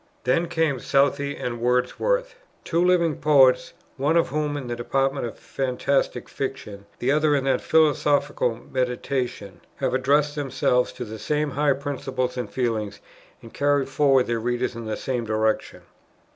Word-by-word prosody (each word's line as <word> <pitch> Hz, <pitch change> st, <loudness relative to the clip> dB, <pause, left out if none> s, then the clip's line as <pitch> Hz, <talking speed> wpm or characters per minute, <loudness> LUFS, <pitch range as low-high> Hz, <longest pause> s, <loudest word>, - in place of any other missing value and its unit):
Then 165 Hz, +7 st, +1 dB
come 160 Hz, -6 st, 0 dB
Southey 140 Hz, +2 st, +1 dB
and 120 Hz, -1 st, -4 dB
Wordsworth, -, -, 0 dB, 0.3 s
"two 170 Hz, +1 st, +1 dB
living 170 Hz, -4 st, +2 dB
poets, 135 Hz, -4 st, +4 dB, 0.2 s
one 145 Hz, +5 st, +2 dB
of 165 Hz, -, +2 dB
whom 150 Hz, +1 st, -1 dB
in 140 Hz, -, -5 dB
the 120 Hz, 0 st, -3 dB
department 135 Hz, +1 st, -1 dB
of -, -, -9 dB
fantastic 135 Hz, +1 st, -1 dB
fiction, 105 Hz, -7 st, -6 dB
the 130 Hz, -, 0 dB
other 150 Hz, 0 st, +3 dB
in 140 Hz, -, 0 dB
that 135 Hz, -1 st, +2 dB
of -, -, -13 dB
philosophical 145 Hz, -5 st, +2 dB
meditation, 125 Hz, -5 st, -3 dB
have 130 Hz, -2 st, -2 dB
addressed 145 Hz, +3 st, +2 dB
themselves 130 Hz, -3 st, 0 dB
to 125 Hz, -, -6 dB
the 110 Hz, 0 st, -8 dB
same 150 Hz, +6 st, -1 dB
high 145 Hz, +1 st, +2 dB
principles 130 Hz, -2 st, -3 dB
and 125 Hz, -4 st, -4 dB
feelings, 110 Hz, -5 st, -2 dB, 0.4 s
and 115 Hz, -, -12 dB
carried 145 Hz, -1 st, +1 dB
forward 135 Hz, -2 st, +3 dB
their 115 Hz, -1 st, -1 dB
readers 120 Hz, +2 st, -1 dB
in 115 Hz, -1 st, -7 dB
the 110 Hz, -, -3 dB
same 125 Hz, -3 st, -2 dB
direction." 110 Hz, 0 st, -1 dB
135 Hz, 160 wpm, -24 LUFS, 125-145 Hz, 0.4 s, poets